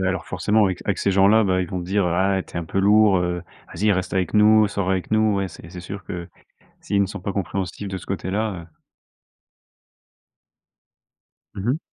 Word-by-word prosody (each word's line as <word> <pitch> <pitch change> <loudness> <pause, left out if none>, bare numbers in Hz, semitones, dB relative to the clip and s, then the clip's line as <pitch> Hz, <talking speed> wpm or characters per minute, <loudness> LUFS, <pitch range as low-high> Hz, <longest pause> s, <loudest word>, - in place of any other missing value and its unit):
Alors, 95 0 -1
forcément, 105 +4 +1
avec 95 -2 -1
avec - - -1
ces - - +1
gens-là, 100 +4 +5
bah, 95 -1 +1
ils 90 - -5
vont 90 - -4
dire: 95 +3 0
«Ah, 95 +3 +1
et - - -7
tu - - -18
es - - -1
un 85 - -4
peu 95 - -3
lourd, 105 -1 +5
heu. 90 -1 -2 0.3
Vas-y 105 0 +1
reste 90 -1 -2
avec 95 -1 0
nous, 110 0 +6
sors 100 -2 -2
avec 95 -1 -2
nous», 110 -2 +3
ouais, 95 -1 -1
c'est 80 0 -13
c'est 90 -1 -8
sûr 95 +3 -8
que 85 -1 -6 0.5
s'ils 100 -1 0
ne 100 - +2
sont 100 - -7
pas 100 - -4
compréhensifs 95 +1 -3
de 95 - -4
ce 90 - -11
côté-là, 100 +3 -2
heu 80 -2 -22 2.8
Mmh 100 +6 -2
mh. 150 - 0
95 Hz, 205 wpm, -22 LUFS, 90-105 Hz, 2.8 s, nous